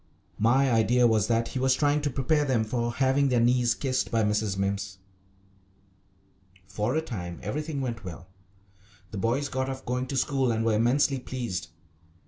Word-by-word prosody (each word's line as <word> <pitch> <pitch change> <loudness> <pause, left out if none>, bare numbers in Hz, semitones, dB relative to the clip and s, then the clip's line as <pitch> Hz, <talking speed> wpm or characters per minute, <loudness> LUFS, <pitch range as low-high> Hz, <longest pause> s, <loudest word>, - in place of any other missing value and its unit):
My 130 +4 +3
idea 120 +2 +3
was 110 -3 +3
that 115 0 +1
he 130 - -4
was 130 0 +3
trying 145 +1 +2
to 145 - -1
prepare 145 +3 +1
them 130 -6 +1
for 120 +2 -2
having 135 +2 +2
their 125 -2 +2
knees 120 0 +3
kissed 130 -2 -1
by 115 -2 +1
Mrs. 105 -1 0
Mimms. 100 0 -2 1.7
For 105 +6 -2
a 160 - 0
time 90 - -6
everything 150 - -3
went 120 -4 -4
well. 90 -1 -8 0.9
The 105 - -5
boys 125 +8 0
got 130 0 -2
off 130 0 -6
going 125 +1 -2
to 135 - -3
school 135 -3 +1
and 115 0 -1
were 115 - +2
immensely 130 +5 +2
pleased. 120 -10 -4
120 Hz, 170 wpm, -27 LUFS, 110-135 Hz, 1.7 s, My